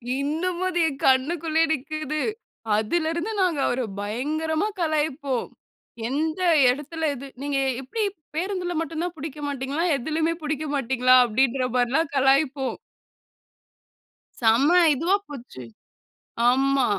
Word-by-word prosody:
இன்னமும் 330 +6 -1
அது 350 -1 -1
என் 280 -3 -5
கண்ணுக்குள்ளேயே 315 +4 +2
நிக்குது. 310 +1 -3 0.6
அதிலிருந்து 330 - -1
நாங்க 350 -6 +1
அவர 250 +1 0 0.2
பயங்கரமா 310 - -1
கலாய்ப்போம், 300 -5 -1 0.6
எந்த 315 +6 -1 0.3
இடத்துல 300 +4 -1
இது? 275 +2 -8
"நீங்க 280 -1 -1 0.2
எப்படி 420 - -3 0.3
பேருந்தில 360 0 -2
மட்டும் 325 0 -4
தான் 355 -1 -4
புடிக்க 300 +1 -7
மாட்டீங்களா? 280 +3 -2
எதுலமே 315 +5 -1
புடிக்க 305 0 -2
மாட்டீங்களா?" 255 -1 +3
அப்படின்ற 255 +2 +1
மாரிலாம் 260 +5 +1
கலாய்ப்போம். 270 0 +2 1.6
செம்ம 235 +7 +4 0.2
இதுவா 335 +8 +2
போச்சு 245 - -9 0.9
ஆமா. 270 +1 +2
290 Hz, 105 wpm, -24 LUFS, 265-320 Hz, 1.6 s, செம்ம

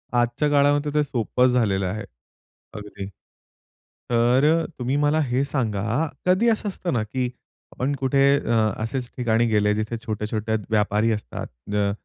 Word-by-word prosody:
आजच्या 120 +5 +1
काळामध्ये 145 +1 +3
ते 150 0 +3
सोपं 125 -1 +1
झालेलं 110 -6 +1
आहे. 105 +4 -3 0.7
अगदी 105 -1 -7 1.0
तर, 130 +7 +3
तुम्ही 125 +2 -1
मला 145 +1 +2
हे 130 -1 0
सांगा, 115 +1 -1 0.2
कधी 185 +6 +4
असं 215 -2 0
असतं 185 -2 -3
ना, 115 -4 +1
की 125 +3 -2 0.4
आपण 135 +3 -2
कुठे 135 +1 +2 0.2
अ, 115 - -3 0.3
असेच 120 +2 -3
ठिकाणी 120 -2 +2
गेले 105 -2 +2
जिथे 110 +2 -2
छोटे-छोटे 110 0 -2
व्यापारी 105 +1 +2
असतात. 105 -1 -4 0.3
अ, 100 -1 +2
120 Hz, 140 wpm, -23 LUFS, 110-145 Hz, 1.0 s, कधी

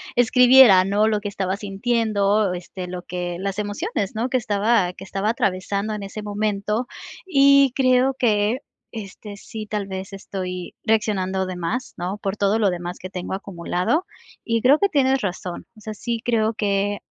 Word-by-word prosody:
escribiera, 245 -4 +7
¿no? 205 +3 +2
Lo 215 -1 +1
que 205 - -5
estaba 195 -1 -2
sintiendo, 205 -1 +1
este, 180 +1 -7
lo 180 0 -6
que 175 -1 -4
las 195 +1 -3
emociones, 205 -1 -3
¿no? 230 +4 -1
Que 255 - +2
estaba 205 -4 +1
que 190 - -11
estaba 195 +2 -2
atravesando 200 -2 -1
en 210 - -5
ese 200 +2 -7
momento. 210 +2 -1 0.4
Y 280 -5 +5
creo 255 0 +3
que, 215 0 +2 0.3
este, 205 -1 -8
sí 215 +1 -8
tal 210 -1 -2
vez 190 +1 -6
estoy 185 -2 -6
reaccionando 195 -4 0
de 185 -1 -5
más, 215 +10 -3
¿no? 180 +3 -3
Por 195 -1 -3
todo 205 +1 +2
lo 205 -4 +2
demás 175 0 -5
que 185 - -7
tengo 180 0 -5
acumulado. 185 - -1 0.4
Y 230 -1 0
creo 280 +4 +6
que 400 - +3
tienes 270 -4 +2
razón, 180 -3 -5
o 215 - -15
sea, 215 0 -6
sí 230 +2 -3
creo 225 -2 +1
que 205 -1 0
205 Hz, 170 wpm, -22 LUFS, 190-230 Hz, 0.4 s, escribiera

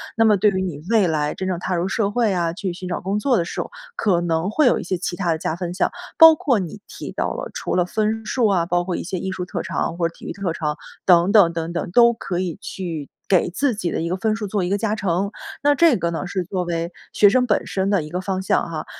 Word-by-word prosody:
那 225 - +3
么 215 -2 +5
对 210 +3 +4
于 190 -1 -1
你 175 -6 -4
未 220 -5 +4
来 150 -2 -1
真 190 - -4
正 180 -2 -2
踏 180 +1 -2
入 175 +2 -1
社 200 0 0
会 225 0 +1
啊， 170 -2 0
去 190 0 -3
寻 180 +1 -7
找 180 - -3
工 195 +3 -1
作 255 +4 +2
的 170 - +1
时 - - -6
候， - - -3 0.3
可 185 -5 +2
能 165 +1 0
会 300 +8 +2
有 245 - +4
一 - - -5
些 185 +1 -2
其 175 0 -4
它 185 -3 -1
的 160 - 0
加 160 - -2
分 175 +1 -4
项。 185 - 0 0.3
包 325 -1 +10
括 275 - +1
你 185 +2 -6
提 - - -8
到 - - -2
了 - - -5
除 - - -3
了 180 - +3
分 215 +4 -1
数 245 0 +1
啊， 190 -4 +2
包 175 0 +1
括 180 0 -3
一 - - -3
些 185 +2 -4
艺 190 +2 -3
术 185 -1 -4
特 180 - -4
长 165 - -2
或 170 -1 +1
者 165 - -11
体 - - -18
育 - - -4
特 195 -4 -3
长， 150 -2 -2 0.3
等 175 +1 +5
等 200 -6 +6
等 165 0 -4
等， 170 - -3
都 235 +4 +6
可 195 -5 -4
以 180 -4 -2
去 165 -6 -5 0.2
给 185 -2 +3
自 255 +9 0
己 200 -5 -2
的 - - -2
一 165 - -2
个 175 - -1
分 215 +2 0
数 220 -1 -4
做 200 -1 -1
一 175 - -1
个 200 - +1
加 215 +1 -1
成， 195 -1 -1 0.3
那 290 0 +5
这 300 -3 +4
个 170 -2 -1
呢 170 +3 -4
是 185 0 -2
作 180 +1 -3
为 170 0 -3 0.2
学 205 - +5
生 250 +5 +3
本 210 - +1
身 190 0 -1
的 200 -5 +2
一 150 - -8
个 180 +1 -2
方 185 0 -2
向 190 - +1
哈。 160 -2 -5
185 Hz, 305 characters per minute, -21 LUFS, 170-210 Hz, 0.3 s, 包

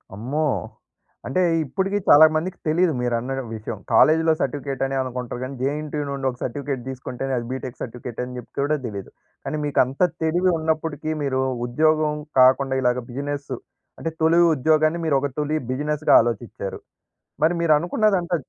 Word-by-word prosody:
అమ్మో! 130 +9 -2 0.8
అంటే 160 +9 +1 0.2
ఇప్పుటికి 190 +8 -1
చాలా 155 +2 +9
మందికి 175 +4 -2
తెలీదు 170 +2 +3
మీరన్న 120 +1 -1
డ - - -1
విషయం. 110 0 -6 0.2
కాలేజ్‌లో 160 +6 +5
సర్టిఫికేట్ 135 0 -2
అని 135 0 -2
అనుకుంటారు. 125 -1 -5
కానీ 135 +1 -5
జేఎన్‌టీయూ 150 +2 -2
నుండి 135 -1 -2
ఒక 125 - -7
సర్టిఫికేట్ 135 0 -3
తీసుకుంటేనే 130 0 -5
అది 120 - -3
బీటెక్ 130 -1 -6
సర్టిఫికేట్ 125 -1 -7
అని 125 0 -7
జెప్తే 120 - -8
గూడా 150 +2 +1
తెలీదు. 100 -3 -7 0.4
కానీ 155 - -2
మీకు 145 - 0
అంత 130 +2 -9 0.2
తెలివి 175 +3 +2
ఉన్నప్పటికీ 155 -1 -2
మీరు 130 -1 0 0.3
ఉద్యోగం 155 +3 +2 0.3
కాకుండా 130 +1 +5
ఇలాగా 125 0 +1
బిజినెస్ 140 +1 -4 0.5
అంటే, 165 - -2
తొలి 165 +2 +4 0.2
ఉద్యోగాన్ని 155 +4 +2
మీరు 150 - +2
ఒక 145 - -1
తొలి 150 +1 0 0.2
బిజినెస్‌గా 150 +3 +1
ఆలోచిచ్చారు. 115 -4 -4 0.6
మరి 160 +3 +4
మీరు 160 -2 +4
అనుకున్నదంతా 180 +1 +1
140 Hz, 155 wpm, -23 LUFS, 130-155 Hz, 0.8 s, చాలా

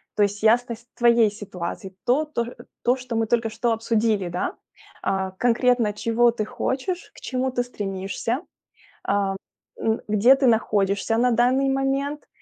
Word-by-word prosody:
то - - +1
есть 205 +1 -1
ясность 235 +1 +2
твоей 235 -3 +4
ситуации, 190 -2 -7
то 275 +6 +2
то 300 -6 -2
ш 240 - -9 0.3
то, 245 - +3
что 250 -2 -6
мы 225 0 +1
только 230 0 +1
что 230 +2 0
обсудили, 220 -4 0
да: 180 +1 -3 0.5
а, 190 -1 -1
конкретно 240 +1 +2
чего 230 +3 +2
ты 220 -2 -3
хочешь, 345 - -3
к - - -14
чему 260 0 -1
ты 245 -1 0
стремишься, 200 +2 -3 0.6
а, 200 -1 +1 0.4
н 220 0 0
где 215 +6 +5
ты 270 - +1
находишься 210 -2 +2
на 245 +1 +3
данный 255 +4 +3
момент, 275 +2 -1
230 Hz, 155 wpm, -24 LUFS, 205-250 Hz, 0.6 s, где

